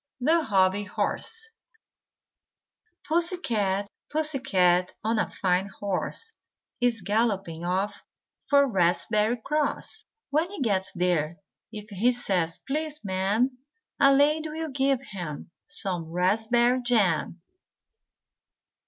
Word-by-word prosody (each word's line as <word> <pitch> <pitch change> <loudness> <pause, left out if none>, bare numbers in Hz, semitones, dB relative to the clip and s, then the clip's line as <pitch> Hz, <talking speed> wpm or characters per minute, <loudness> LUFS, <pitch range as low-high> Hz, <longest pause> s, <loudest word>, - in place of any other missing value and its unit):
THE 320 +6 +3
HOBBY 200 -5 +2
HORSE 450 - -3 1.6
Pussy 340 +3 +1
Cat, 205 - -1 0.2
Pussy 310 -2 -1
Cat 180 -7 +2
on 220 0 +1
a - - 0
fine 185 0 0
horse 205 - -3 0.5
Is 240 -3 +1
galloping 200 -6 0
off 185 +4 -1 0.5
for 280 -1 +6
Raspberry 210 +2 +2
Cross. 305 +8 -2 0.3
When 315 +5 +1
he 405 - -8
gets 195 -5 0
there 175 -3 +1 0.4
if 210 -1 -9
he 215 +6 +3
says 180 -8 -1
"Please, 305 -1 -3
Ma'am," 205 +7 0 0.4
A 275 -1 +6
lady 300 +3 +3
will 320 +1 -4
give 270 -1 +1
him 170 -5 -6 0.2
some 185 - -3
raspberry 225 +8 +2
jam. 195 -8 +1
220 Hz, 110 wpm, -27 LUFS, 185-280 Hz, 1.6 s, for